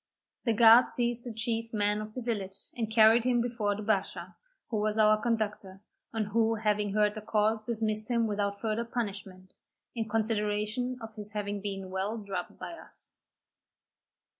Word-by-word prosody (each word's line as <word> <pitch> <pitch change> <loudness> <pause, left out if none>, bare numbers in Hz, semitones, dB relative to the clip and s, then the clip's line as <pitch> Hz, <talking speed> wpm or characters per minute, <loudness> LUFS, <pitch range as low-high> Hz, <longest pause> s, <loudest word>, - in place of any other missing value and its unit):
The 230 - +3
guards 230 +2 +7
seized 240 0 -1
the 240 - -4
chief 230 0 -2
man 210 -1 +1
of 215 0 -8
the 255 - -4
village, 200 -5 -3 0.2
and 225 -3 -2
carried 220 +1 +6
him 245 -1 +2
before 230 -4 -1
the 210 - -6
bashaw, 205 -2 -1 0.4
who 220 - 0
was 215 +1 0
our 215 0 +5
conductor, 210 -4 -2 0.3
and 215 -3 -2
who 225 +1 +2
having 210 -2 0
heard 210 -1 +3
the 215 - -7
cause 215 +1 +1
dismissed 215 -1 -1
him 235 -1 +2
without 200 -1 -1
further 220 +1 -1
punishment, 195 -5 -5 0.4
in 225 -2 -3
consideration 215 +3 -1
of 225 -1 -8
his 210 -1 -7
having 205 -1 -3
been 195 -2 -5
well 195 +4 -2
drubbed 195 -4 -5
by - - -7
us. 335 - -11
215 Hz, 165 wpm, -30 LUFS, 205-230 Hz, 0.4 s, guards